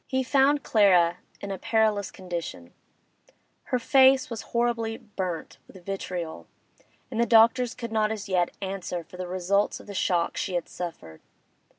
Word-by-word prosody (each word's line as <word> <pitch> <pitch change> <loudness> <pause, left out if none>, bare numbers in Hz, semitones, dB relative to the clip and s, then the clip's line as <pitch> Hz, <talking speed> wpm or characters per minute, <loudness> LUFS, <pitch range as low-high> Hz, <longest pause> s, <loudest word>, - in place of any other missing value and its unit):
He 260 0 0
found 280 +2 +3
Clara 180 -5 +4 0.2
in 200 - -5
a 190 - -4
perilous 215 -3 +1
condition; 170 - -7 0.9
her 250 - 0
face 265 +2 +4
was 225 - -4
horribly 235 -1 0
burnt 190 -6 -5
with 185 -3 -15
vitriol, 180 -4 -5 0.6
and 230 -1 0
the - - +4
doctors 235 +2 +5
could 235 -2 -6
not 215 -1 +1
as 210 -2 -5
yet 180 -2 +1
answer 190 -2 -4
for 180 - -14
the 180 0 -5
results 185 +3 0
of - - -13
the 205 - -8
shock 175 -3 0
she 185 - -2
had 175 - -2
suffered. 160 - -8
200 Hz, 160 wpm, -26 LUFS, 180-230 Hz, 0.9 s, doctors